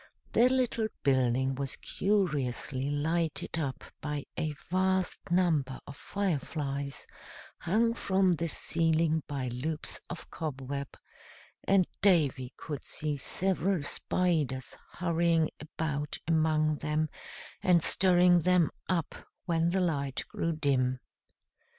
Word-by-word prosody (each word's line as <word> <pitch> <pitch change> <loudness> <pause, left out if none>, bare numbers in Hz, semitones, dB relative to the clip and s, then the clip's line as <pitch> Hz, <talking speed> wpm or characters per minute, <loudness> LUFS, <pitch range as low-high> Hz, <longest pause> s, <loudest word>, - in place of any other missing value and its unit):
The 245 +2 +5
little 250 -4 +1 0.2
building 130 -1 +2
was 135 0 -3
curiously 140 - -1
lighted 160 +3 -1
up 140 -4 -3 0.2
by 150 -1 -3
a 155 -1 -1
vast 185 +4 0
number 160 -7 +2
of 140 - -9
fire 195 -2 -1
flies, 140 -2 -4 0.5
hung 225 +7 +2
from 190 -5 +2
the 170 +1 -1
ceiling 160 0 +2
by 135 -4 -3
loops 150 +6 -3
of 175 - -8
cobweb; 140 -3 -5 0.7
and 195 -2 +5 0.2
Davy 145 -10 +3
could 145 -3 -6
see 150 -1 -2
several 185 +3 0
spiders 150 -5 0 0.2
hurrying 170 -2 +2
about 150 -1 -3
among 155 -2 +2
them 155 +1 0 0.5
and 175 -3 +4
stirring 180 -1 +5
them 180 -1 +3 0.2
up 170 -4 0 0.3
when 165 -1 +2
the 190 +2 +1
light 140 -6 -1
grew 165 0 -1
dim. 130 -4 +1
160 Hz, 115 wpm, -30 LUFS, 140-180 Hz, 0.7 s, The